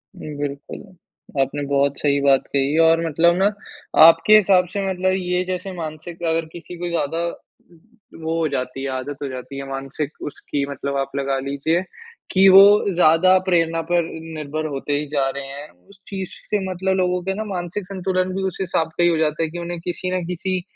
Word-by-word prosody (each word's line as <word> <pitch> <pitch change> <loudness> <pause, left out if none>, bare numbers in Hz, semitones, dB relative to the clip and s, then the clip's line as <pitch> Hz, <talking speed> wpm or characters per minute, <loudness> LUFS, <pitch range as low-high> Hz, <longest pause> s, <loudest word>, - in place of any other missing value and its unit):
उम, 150 -2 -8
बिल्कुल। 145 0 -5 0.6
आपने 140 +2 -1
बहुत 140 0 +1
सही 140 -1 +2
बात 135 -1 +3
कही 140 +2 +1
और 165 +1 +3
मतलब 170 +2 +3
ना 195 - +3 0.6
आपके 165 +6 +7
हिसाब 190 -3 +5
से 200 - -1
मतलब 185 0 0
ये 180 0 -1
जैसे 185 +1 -4
मानसिक 165 +1 -7
अगर 165 0 0
किसी 175 +1 -9
को 175 +1 -4
ज़्यादा 165 -1 -1 1.0
वो 160 +1 -1
हो 160 - +1
जाती 130 +1 -3
है 140 - -2
आदत 130 +2 -5
हो - - -2
जाती 130 +2 -7
है 135 0 -6
मानसिक 135 +2 -4 0.2
उसकी 140 0 -3
मतलब 140 0 -4
आप 135 0 -2
लगा 135 -1 -1
लीजिए 160 +5 0 0.5
कि 195 +1 +5
वो 195 +1 +10 0.3
ज़्यादा 180 +2 +5
प्रेरणा 165 -1 +2
पर 175 -1 +3 0.3
निर्भर 155 +1 -4
होते 140 +1 -3
ही 150 - -3
जा 135 -2 +1
रहे 140 0 -5
हैं। 140 +2 -9 0.2
उस 200 -1 -18
चीज़ 190 -2 -5 0.2
से 210 - +1
मतलब 190 +1 -1
लोगों 180 -1 +1
के 190 +1 -1
ना 215 - -3
मानसिक 180 0 -4
संतुलन 185 -1 -1
भी 195 - -2
उस - - -11
हिसाब 165 -3 0
का 175 - +3
ही 175 - +5
हो 165 - +1
जाता 155 0 0
है 160 - -1
कि 175 +2 -6
उन्हें 170 0 -5
किसी 180 +1 -3
न 180 - -3
किसी 180 +1 -2
165 Hz, 195 wpm, -21 LUFS, 140-180 Hz, 1.0 s, वो